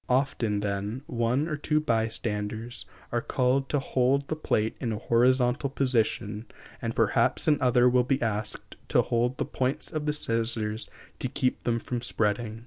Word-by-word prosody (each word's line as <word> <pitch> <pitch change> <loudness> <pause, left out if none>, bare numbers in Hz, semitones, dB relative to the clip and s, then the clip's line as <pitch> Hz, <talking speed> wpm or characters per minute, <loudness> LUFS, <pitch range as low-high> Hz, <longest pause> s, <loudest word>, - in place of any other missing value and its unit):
Often, 120 -5 +1
then, 105 +5 -3
one 120 +5 0
or 155 - -2
two 150 +1 +1
bystanders 110 -2 -2 0.2
are 120 - 0
called 130 +2 +1
to 145 - +1
hold 135 +1 +1
the 155 - 0
plate 110 -8 0
in 115 - -2
a 105 - -2
horizontal 125 +4 +2
position, 115 -5 0 0.3
and - - -3
perhaps - - +2
another 125 -4 +4
will 125 0 +4
be 135 +2 +1
asked 110 -2 -3
to - - +3
hold 120 +2 0
the - - -1
points 130 +6 -2
of 155 -1 -2
the 150 - +2
scissors 115 -4 -1 0.3
to - - -1
keep 130 0 -1
them 115 -1 +2
from 120 +1 -4
spreading. 110 -1 -1
120 Hz, 160 wpm, -27 LUFS, 110-130 Hz, 0.3 s, another